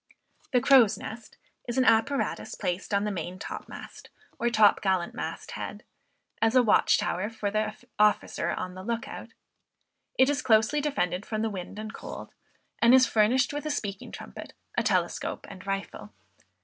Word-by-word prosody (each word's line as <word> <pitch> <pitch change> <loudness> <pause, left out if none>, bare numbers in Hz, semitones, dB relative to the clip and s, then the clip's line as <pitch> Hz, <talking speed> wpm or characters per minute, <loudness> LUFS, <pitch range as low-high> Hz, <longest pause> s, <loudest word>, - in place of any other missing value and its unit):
The 250 -2 +3
crow's 260 -5 +6
nest 225 +1 -9 0.3
is 240 +1 -3
an 260 - +4
apparatus 225 +5 +1
placed 180 +4 -3
on 200 0 +2
the 210 - -1
main 180 -1 -5
top - - -7
mast, - - -10 0.3
or 240 - +2
top 215 -3 +5
gallant 190 -3 0
mast - - -5
head, - - -6 0.6
as 225 +2 +3
a 255 - +6
watch 220 - +4
tower 185 +4 -1
for 215 -3 -3
the 215 0 -1 0.2
officer 210 0 +2
on 180 - -3
the 185 - -8
lookout. 230 +3 -5 0.8
It 260 - +6
is 290 0 0
closely 220 +5 +3
defended 185 - -1
from 215 0 -3
the 225 - -1
wind 190 +1 -7
and 215 0 -6
cold, - - -8 0.5
and 235 +2 +7
is 260 -1 +7
furnished 245 +5 +2
with 290 +1 -3
a - - -1
speaking 205 -10 -4
trumpet, - - -9 0.2
a - - +2
telescope - - -1
and 190 0 -12
rifle. 195 - -4
215 Hz, 170 wpm, -28 LUFS, 195-245 Hz, 0.8 s, and